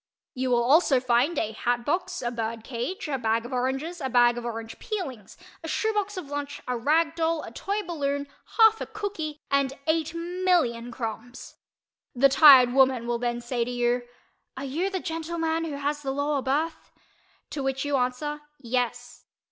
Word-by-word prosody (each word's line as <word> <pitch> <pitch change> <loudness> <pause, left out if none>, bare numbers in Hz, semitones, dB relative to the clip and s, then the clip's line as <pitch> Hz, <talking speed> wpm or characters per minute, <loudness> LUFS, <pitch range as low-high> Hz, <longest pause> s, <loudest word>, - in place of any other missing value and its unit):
You 260 0 -2
will 240 -1 +3
also 275 +1 +4
find 250 +6 +2
a 220 - 0
hat 240 +2 -1
box, 355 +1 -1
a 240 - -1
bird 225 -1 -4
cage, 270 - -4
a 275 -3 -2
bag 225 0 0
of 250 - -7
oranges, 270 +7 -2
a 265 - -2
bag 240 -1 +5
of 240 0 -6
orange 225 -1 -6
peelings, 270 - -5 0.3
a - - -5
shoe 440 +7 0
box 415 -1 -2
of 365 - -4
lunch, 285 0 -5
a 250 - -1
rag 310 +7 +2
doll, 330 -1 0
a - - -8
toy 405 - -3
balloon, 285 -5 -2 0.3
half 445 -1 +6
a - - -3
"cookie" 390 -9 -5
and 275 -1 +2
8,000,000 330 -6 0
crumbs. 240 +1 -7 0.6
The 275 +3 +5
tired 265 -3 +8
woman 260 -3 +4
will 240 0 -1
then 240 0 -2
say 240 0 -1
to 235 - -5
you 245 0 0 0.5
"Are 270 - -4
you 325 +9 -1
the 380 -1 -2
gentleman 325 -1 -2
who 305 -3 -4
has 290 +1 -2
the 275 - -4
lower 285 +1 0
berth?" 310 +5 -2 0.6
to 285 - -3
which 270 +1 -1
you 290 -1 0
answer 265 +4 -2 0.2
"Yes." 245 -1 -3
275 Hz, 180 wpm, -26 LUFS, 245-325 Hz, 0.6 s, tired